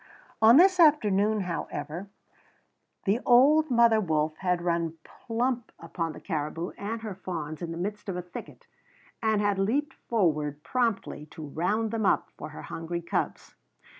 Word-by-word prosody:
On 225 +4 +8
this 370 +2 +6
afternoon, 215 - +4
however, 170 0 -4 1.0
the 205 +3 +2
old 290 +6 +5
mother 235 -2 +5
wolf 155 -4 0
had 180 -2 0
run 170 -2 -1
plump 240 +1 -3
upon 165 -3 -4
the - - -10
caribou 165 0 -3
and 220 +3 -5
her 215 -3 -4
fawns 165 -5 -6
in 170 - -4
the 165 - -5
midst 205 +3 -4
of 180 - -3
a 180 - -4
thicket, 180 - -10 0.6
and 220 -2 +2
had 205 -1 +1
leaped 265 +9 0
forward 150 -9 -1
promptly 225 -8 -1
to 155 0 -9
round 205 +9 -1
them 220 -3 0
up - - +1
for - - -8
her 155 - -10
hungry 170 +1 -5
cubs. - - -3
195 Hz, 155 wpm, -28 LUFS, 165-225 Hz, 1.0 s, On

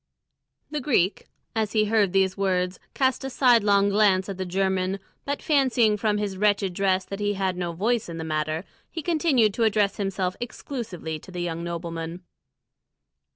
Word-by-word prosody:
The 300 -1 -2
Greek, 215 - +1 0.3
as 220 -2 0
he 215 -1 +3
heard 210 -3 +2
these 190 0 +2
words, 185 -2 0 0.2
cast 260 -1 +1
a 270 - -3
sidelong 210 -6 +4
glance 200 -2 +3
at 195 - -5
the 185 - -2
German, 190 +1 0 0.3
but 285 0 -3
fancying 255 -7 +3
from 210 0 0
his 205 -2 -3
wretched 200 -2 +2
dress 190 0 +1
that 195 - -6
he 205 0 0
had 190 -1 -1
no 175 -1 -3
voice 215 +5 0
in 165 - -6
the 160 - -4
matter, 155 +2 -2 0.2
he 325 - -6
continued 290 - +2
to 230 - 0
address 210 -2 +2
himself 190 -2 -1
exclusively 225 - -5
to 190 - -15
the 180 -1 -5
young 170 -1 -3
nobleman. 170 0 -5
195 Hz, 170 wpm, -25 LUFS, 180-220 Hz, 0.3 s, sidelong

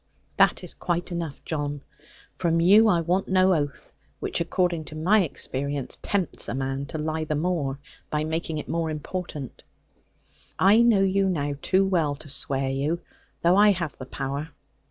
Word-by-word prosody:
'That - - +4
is - - -7
quite 175 0 -2
enough, 165 -5 -5
John. 145 -2 -3 0.5
From 165 -2 +1
you 205 +6 +6
I 175 -5 +3
want 180 +4 0
no 185 0 +4
oath; 145 -4 -3 0.3
which, - - -1
according 170 -1 0
to 155 - -9
my 190 +7 +4
experience, 140 -4 -3
tempts 195 -4 -1
a 120 - -2
man 135 +1 -3
to 160 - -5
lie 155 +1 -2
the 155 -1 -2
more, 150 -4 -1 0.3
by 150 0 -1
making 160 0 -2
it 150 - -5
more 165 -1 -1
important. 155 -3 -6 0.9
I 205 +5 +6
know 225 -5 +5
you 195 0 +2
now 145 -5 -1
too 190 +1 +3
well 165 -7 +1
to 145 0 -12
swear 135 0 0
you, 145 +6 -1 0.4
though 175 +2 +5
I 210 +1 +6
have 170 -4 -4
the 130 - -7
power. 140 +3 -4
160 Hz, 170 wpm, -25 LUFS, 145-185 Hz, 0.9 s, you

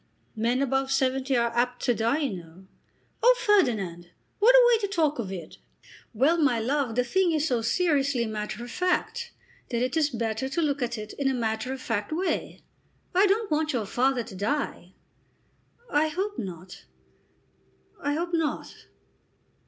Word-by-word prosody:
Men 235 +4 +1
above 270 0 0
seventy 265 -1 +1
are 235 0 0
apt 245 +1 0
to 245 - +3
die, 230 +4 +1
you 260 -10 -1
know." 170 +2 -14 0.6
"Oh, - - +6
Ferdinand, 205 - +2 0.3
what 475 +4 +6
a - - +8
way 455 - +3
to 410 - -1
talk 315 -8 0
of 200 -5 -3
it!" 175 -5 -8 0.5
"Well, 275 +9 +3
my 265 -7 +3
love, 255 0 -1
the 250 - +3
thing 350 +7 +1
is 310 0 +1
so 245 -5 0
seriously 275 -2 +1
matter 215 +1 -4
of 240 - -8
fact, 465 - -1 0.4
that 240 -1 0
it 255 +3 -1
is 310 -2 +2
better 230 0 -2
to 335 +5 -1
look 285 -2 0
at 240 -1 -2
it 215 0 -7
in 280 - +1
a 265 - 0
matter 225 +1 -2
of 265 - -4
fact 210 -1 -2
way. 360 +4 -2 0.5
I 380 +3 +5
don't 410 -1 0
want 305 0 +1
your 230 -4 -1
father 250 +4 +1
to 215 - -11
die." 200 -3 -3 1.0
"I 300 +2 +3
hope 385 +6 -3
not. 180 - -8 1.2
I 285 - 0
hope 340 +3 -3
not." 320 -3 -1
265 Hz, 170 wpm, -26 LUFS, 225-315 Hz, 1.2 s, a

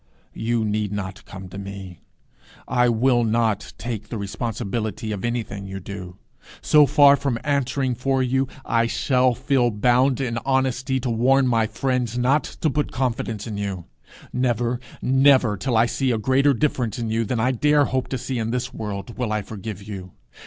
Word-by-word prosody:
You 115 0 -1
need 105 -1 -1
not 95 -2 -5
come 95 -1 -9
to 95 - -8
me. 95 -3 -8 0.7
I 125 -1 +3
will 120 +1 +3
not 110 -2 0
take 110 -3 -5
the 115 - -4
responsibility 110 +1 -3
of 100 -3 -4
anything 115 -5 -3
you 95 0 -6
do. 90 -1 -8 0.4
So 150 -1 +5
far 140 +2 +7
from 140 -4 -1
answering 140 -2 0
for 130 +2 0
you, 130 +1 +1 0.2
I 115 0 +2
shall 125 0 +2
feel 130 -1 +2
bound 125 +5 +2
in 120 -3 -1
honesty 130 0 0
to 125 - -2
warn 130 +4 +3
my 115 -3 +2
friends 125 +1 -1
not 130 +5 +2
to 155 - -2
put 150 +1 -1
confidence 115 -4 -2
in 110 -3 -5
you. 95 -4 -4 0.5
Never, 120 -1 0 0.2
never, 130 -4 +4
till 120 +2 -1
I 115 - +5
see 130 +2 -1
a 120 - +1
greater 130 +5 +3
difference 120 -4 -1
in 115 -2 -3
you 115 +1 +1
than 115 +2 -2
I 125 +3 +2
dare 145 +3 +3
hope 130 -1 -1
to 130 - -3
see 125 0 -3
in 110 0 -2
this 125 +1 -2
world, 105 +1 -6
will 120 -4 -1
I 105 -1 -1
forgive 100 -1 -7
you. 95 -4 -7
120 Hz, 180 wpm, -23 LUFS, 105-130 Hz, 0.7 s, far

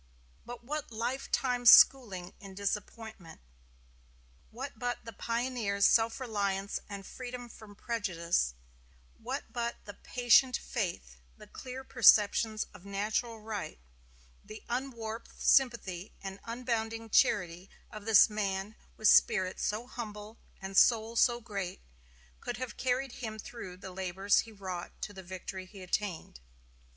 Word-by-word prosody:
What 240 0 -9
but 300 0 -4
lifetime 245 +1 -1
schooling 200 -8 +7
in 195 -1 -11
disappointment; 205 -2 -5 1.1
what 265 +5 -8
but 245 -1 -3
the 230 - -8
pioneer's 230 -3 -1
self 225 +1 +4
reliance 200 -5 -2
and 200 -1 -7
freedom 250 +1 -7
from 215 -3 -13
prejudice; 175 - -1 0.6
what - - -5
but 235 -1 -2
the 205 - -8
patient 250 +3 +3
faith, 170 - -4 0.2
the - - -13
clear 260 +1 -8
perceptions 220 -3 +4
of - - -14
natural 215 +3 -2
right, 210 -7 -5 0.7
the 215 +1 -11
unwarped 235 -3 -5
sympathy 220 -8 +2
and 195 0 -7
unbounding 230 -1 -3
charity 180 -7 +2 0.2
of 215 -2 -9
this 225 -3 +7
man 205 -1 -3 0.2
with 215 - +2
spirit 185 -3 +4
so 215 +3 -1
humble 215 -3 -8 0.2
and 195 0 -7
soul 225 -1 +4
so 240 0 +4
great, 200 -6 -5 0.6
could 240 - -5
have 250 -3 -5
carried 260 +1 -1
him 220 -3 -6
through 205 -4 -8
the 190 0 -9
labors 190 +2 +1
he 225 - -3
wrought 190 -4 -7
to 205 - -4
the 190 - -9
victory 185 +1 -7
he 195 -1 -11
attained? 180 - -3
215 Hz, 130 wpm, -31 LUFS, 195-240 Hz, 1.1 s, schooling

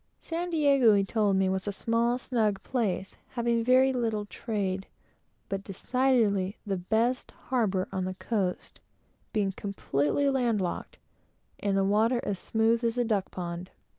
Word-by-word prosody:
San 345 +2 -3
Diego, 280 -9 +5
he 200 - +3
told 205 -1 +1
me, 190 0 +3
was 190 +1 -1
a - - +1
small, 230 +4 +1
snug 215 -6 0
place, 210 -7 -2 0.2
having 235 -2 +1
very 260 +2 +5
little 225 -4 -1
trade, 200 -3 -3 0.6
but 195 0 -3
decidedly 210 -2 +1
the 200 -2 -1
best 225 +7 0 0.2
harbor 200 -7 +1
on 190 -1 -2
the 185 0 -4
coast, 190 -3 -3 0.5
being 205 -3 +1
completely 195 - -1
land 245 -5 +2
locked, 180 -2 -4 0.6
and 200 -1 0
the 195 - +3
water 220 +5 +3
as 195 -2 -2
smooth 225 +1 +1
as 230 +1 0
a 245 - +3
duck 205 -4 0
pond. 175 0 -5
215 Hz, 150 wpm, -28 LUFS, 195-240 Hz, 0.6 s, Diego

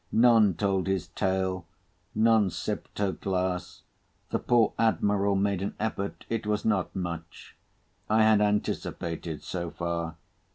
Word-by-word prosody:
None 115 -5 +5
told 95 -3 0
his 95 -4 -1
tale. 95 -2 -1 0.5
None 110 -2 +4
sipt - - -5
her 100 -2 +1
glass. 95 -1 -2 0.5
The - - +1
poor 120 -3 +3
Admiral 100 -3 +2
made 100 -1 +1
an 100 - -3
effort—it 110 +1 -3
was 105 -1 0
not 100 -5 0
much. 85 -3 -6 0.5
I 110 +1 +5
had 110 -1 +5
anticipated 85 -6 -2
so 85 -2 -4
far. 85 0 -3
100 Hz, 125 wpm, -28 LUFS, 90-105 Hz, 0.5 s, None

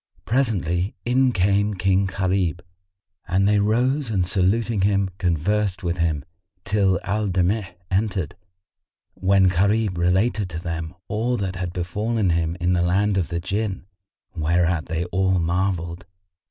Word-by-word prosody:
Presently 100 - 0
in 130 +1 +3
came 100 +1 +1
King 95 +1 +2
Gharib, 95 -3 -1 0.7
and 95 +3 +2
they 105 0 +3
rose 125 +6 +1
and 95 -5 +1
saluting 100 +3 +1
him, 100 -1 +2
conversed 95 +3 0
with 85 0 -2
him, 80 -4 0 0.4
till 100 -3 +2
Al 105 +2 -1
Damigh 95 0 0 0.2
entered, 95 -5 -1 0.8
when 95 0 +3
Gharib 100 +1 +1
related 95 +3 +1
to 80 -1 -5
them 85 -1 -5
all 120 +4 -1
that 95 -3 -3
had 90 -1 -3
befallen 100 +3 -1
him 85 0 0
in 90 +1 +1
the 90 - +2
land 95 +4 +2
of 90 -4 0
the 85 +1 -3
Jinn, 95 +1 -3 0.5
whereat 85 +1 +1
they 85 +1 -2
all 95 +1 +1
marvelled. 85 0 -1
95 Hz, 140 wpm, -23 LUFS, 85-105 Hz, 0.8 s, in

